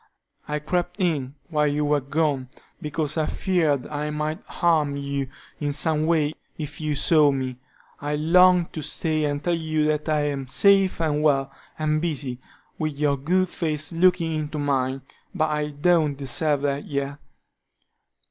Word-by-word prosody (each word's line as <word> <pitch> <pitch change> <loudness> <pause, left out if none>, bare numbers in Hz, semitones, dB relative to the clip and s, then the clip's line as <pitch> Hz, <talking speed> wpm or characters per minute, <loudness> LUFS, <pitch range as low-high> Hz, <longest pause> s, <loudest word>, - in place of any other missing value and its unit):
I 150 - -1
crept 175 +5 -2
in 145 -7 -1
while 150 -2 +2
you 150 +1 0
were 145 0 +2
gone, 140 -2 -1 0.3
because 150 0 -2
I 155 - +1
feared 160 -8 +1
I 150 0 -3
might 150 +1 -3
harm 155 -4 +1
you 140 -1 -3 0.3
in 145 -1 -1
some 155 +1 +2
way 155 -3 +2 0.2
if 150 -1 -6
you 155 -1 -1
saw 150 +1 +4
me. 130 -2 -3 0.4
I 145 +1 -2
longed 180 +3 +4
to 155 - -4
stay 155 +1 0
and 145 0 -2
tell 175 - +1
you 155 -2 0
that 155 0 0
I 155 -1 +2
am 135 -2 -4
safe 195 +6 +4
and 150 -2 +1
well, 135 -3 +2 0.3
and 155 0 0
busy, 140 -7 -2 0.4
with 155 -2 -2
your 145 -1 +2
good 180 +7 +1
face 155 -1 -2
looking 170 -1 +3
into 155 -1 -3
mine, 135 -2 -1 0.3
but 155 -3 +1
I 150 0 -1
don't 150 -1 +2
deserve 145 +1 0
that 140 0 -1
yet. 140 0 -3
150 Hz, 160 wpm, -24 LUFS, 145-160 Hz, 0.4 s, saw